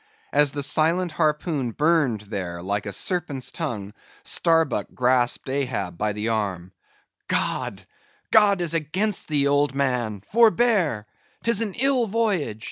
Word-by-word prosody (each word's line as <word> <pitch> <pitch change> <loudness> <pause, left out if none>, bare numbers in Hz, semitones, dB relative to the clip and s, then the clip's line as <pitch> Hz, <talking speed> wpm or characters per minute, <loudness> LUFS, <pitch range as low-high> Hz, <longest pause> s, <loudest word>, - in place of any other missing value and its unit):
As 145 -2 +4
the 145 -1 -1
silent 165 +5 +2
harpoon 150 -5 -1
burned 150 -8 +1
there 90 -5 -6
like 100 +2 -2
a - - -3
serpent's 140 - -2
tongue, 105 - -5 0.3
Starbuck 165 -1 +2
grasped 125 0 +1
Ahab 125 -10 -2
by 105 0 0
the 105 +2 -3
arm—"God, 95 -5 -4 0.5
God 205 -4 +5
is 170 -2 -1
against 175 +6 -1
thee, 145 -2 +2
old 145 0 +1
man; 120 -7 -1
forbear! 220 - +3 0.4
'tis 230 -2 +3
an 210 -4 -3
ill 260 -2 +2
voyage! 200 - -1
145 Hz, 125 wpm, -24 LUFS, 110-175 Hz, 0.5 s, God